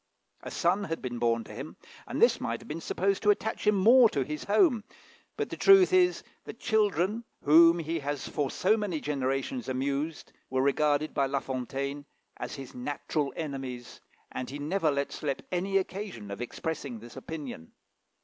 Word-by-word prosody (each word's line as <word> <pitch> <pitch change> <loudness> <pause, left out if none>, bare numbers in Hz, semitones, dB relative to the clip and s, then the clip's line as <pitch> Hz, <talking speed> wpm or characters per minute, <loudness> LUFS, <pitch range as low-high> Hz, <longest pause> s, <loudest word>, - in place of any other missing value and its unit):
A - - -7
son 190 +4 +1
had 165 -3 -3
been 120 -2 -5
born 115 -1 +1
to - - -11
him, - - -8 0.3
and - - -4
this - - +4
might - - -2
have - - -14
been 160 +3 -5
supposed 195 +3 0
to 210 - +2
attach 215 +1 0
him 200 -3 +3
to 230 - +6
his 150 +1 -5
home; 220 - +3 0.5
but - - -2
the - - -3
truth 390 -1 +6
is, 360 -1 +4 0.2
that - - -9
children, 210 -1 +1 0.2
whom 165 +3 +7
he 165 0 -2
has 145 -3 -3
for 145 -3 -1
so 190 - +2
many 205 -7 -2
generations 140 - -2
amused, 140 +4 -2 0.2
were 130 0 +1
regarded 145 +2 +2
by 140 - +1
La 140 +1 0
Fontaine 135 +2 -4 0.3
as - - -5
his 135 -3 -9
natural 145 +3 -2
enemies, 135 -5 -6 0.3
and 130 - -5
he 140 - -6
never 155 +3 0
let 140 -1 -1
slip 140 -3 -3
any 190 +2 +1
occasion 185 - -4
of 100 +3 -6
expressing 140 0 -4
this 115 +2 -12
opinion. 135 - -7
150 Hz, 175 wpm, -29 LUFS, 135-195 Hz, 0.5 s, whom